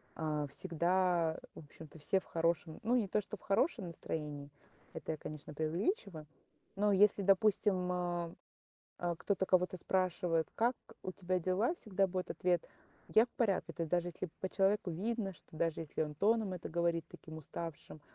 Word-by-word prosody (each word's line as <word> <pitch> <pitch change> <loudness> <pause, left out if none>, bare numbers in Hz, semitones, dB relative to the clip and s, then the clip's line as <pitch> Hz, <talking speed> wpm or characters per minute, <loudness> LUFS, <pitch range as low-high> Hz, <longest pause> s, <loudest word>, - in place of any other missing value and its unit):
а, 150 -2 -1
всегда, 175 -1 +1 0.2
в - - -8
общем-то, 155 +1 -12
все 190 +6 +1
в - - -17
хорошем 165 -1 0
ну, 235 +3 +3
не 220 -5 +2
то - - +2
что - - -7
в - - -21
хорошем 200 - +1
настроении, 150 -3 -5 0.4
это - - -4
я, - - -5
конечно, 150 0 -7
преувеличиваю. 165 - -1 0.5
Но 205 0 +4
если, 200 0 +5
допустим, 195 -2 +3
а, 175 -1 -1 0.7
а, 175 -2 -1
кто-то 190 0 0
кого-то 185 0 +3
спрашивает: 175 -3 +1
"Как 240 +2 +2 0.3
у 185 - -3
тебя 185 -1 -1
дела?" 190 - +2
Всегда 195 -2 +1
будет 185 0 -3
ответ: 175 -2 +1 0.4
"Я 225 +3 +6
в - - -31
порядке". 195 -7 0
То 165 - -3
есть 160 - -3
даже 175 0 +2
если 175 +1 -5
по 190 - -1
человеку 195 -1 +2
видно, 200 +3 -1
что 160 - -16
даже 165 0 0
если 155 0 -2
он 150 -1 -3
тоном 210 +4 +2
это 180 - -5
говорит 170 -1 +1
таким 160 0 -10
уставшим, 160 0 -7
180 Hz, 170 wpm, -35 LUFS, 165-195 Hz, 0.7 s, Я